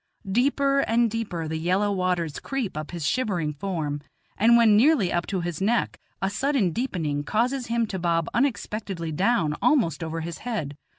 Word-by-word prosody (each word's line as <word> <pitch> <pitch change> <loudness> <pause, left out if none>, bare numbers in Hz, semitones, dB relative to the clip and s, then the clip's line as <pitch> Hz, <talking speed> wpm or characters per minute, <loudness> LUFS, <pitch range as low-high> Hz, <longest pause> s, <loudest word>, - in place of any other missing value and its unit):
Deeper 275 +4 +2
and 230 -3 +2
deeper 200 -8 -3
the 160 0 -3
yellow 185 +5 +1
waters 180 -5 -1
creep 265 - -3
up 155 0 -5
his 170 -4 -3
shivering 180 -11 0
form, 150 -3 -3 0.3
and 235 +3 +5
when 225 -3 +6
nearly 235 - +4
up 175 -1 -1
to 190 -3 -2
his 170 0 -4
neck, 230 +5 +1 0.2
a - - +3
sudden 230 -2 +1
deepening 160 - -2
causes 245 - 0
him 235 0 +1
to 195 -3 -5
bob 170 -1 +1
unexpectedly 210 - -1
down 180 -2 +1
almost 175 - +2
over 165 0 -3
his 165 0 -6
head. 205 - -4
195 Hz, 170 wpm, -25 LUFS, 165-235 Hz, 0.3 s, when